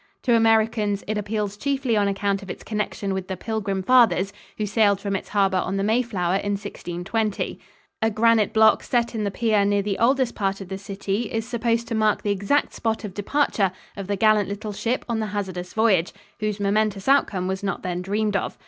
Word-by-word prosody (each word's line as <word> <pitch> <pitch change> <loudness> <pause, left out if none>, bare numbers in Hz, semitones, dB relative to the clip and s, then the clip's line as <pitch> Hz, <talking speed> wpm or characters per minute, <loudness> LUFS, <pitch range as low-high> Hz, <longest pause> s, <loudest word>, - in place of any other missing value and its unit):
To 245 - +3
Americans 220 -2 +2
it 215 - -1
appeals 210 -1 -2
chiefly 270 -1 0
on 205 -1 +2
account 200 0 0
of 195 - -11
its - - -7
connection 210 -2 -3
with 190 -1 -4
the 190 - -4
Pilgrim 200 -2 -2
Fathers, 200 -5 +4 0.2
who 215 - -1
sailed 205 -1 +3
from 200 -1 -2
its - - -5
harbor 195 -2 +2
on 190 +2 -2
the 195 - 0
Mayflower 205 -5 +1
in 205 +1 -2
1620. 200 +1 -3 0.4
A 220 - +3
granite 225 0 +3
block 220 0 +5
set 240 -1 0
in 215 -2 -2
the - - 0
pier 215 0 +1
near 200 0 +2
the 200 -1 -2
oldest 255 +1 +2
part 195 -2 -1
of 195 -2 -9
the 190 0 -5
city 200 +3 -3
is 225 0 -2
supposed 235 -1 0
to 235 - -4
mark 215 -1 +1
the 205 - 0
exact 200 +9 +1
spot 225 0 -2
of 205 -3 -6
departure 205 -2 +1 0.2
of 195 -2 -6
the 200 - 0
gallant 210 -1 +3
little 205 +1 -5
ship 235 +5 -2
on 230 -2 -1
the 215 - -1
hazardous 185 -3 -4
voyage, 205 -6 +2 0.3
whose 215 -1 -2
momentous 205 0 0
outcome 210 -9 +2
was 190 0 -2
not 195 -1 -3
then 180 -1 -2
dreamed 205 +2 -1
of. 195 - -2
205 Hz, 205 wpm, -23 LUFS, 195-225 Hz, 0.4 s, block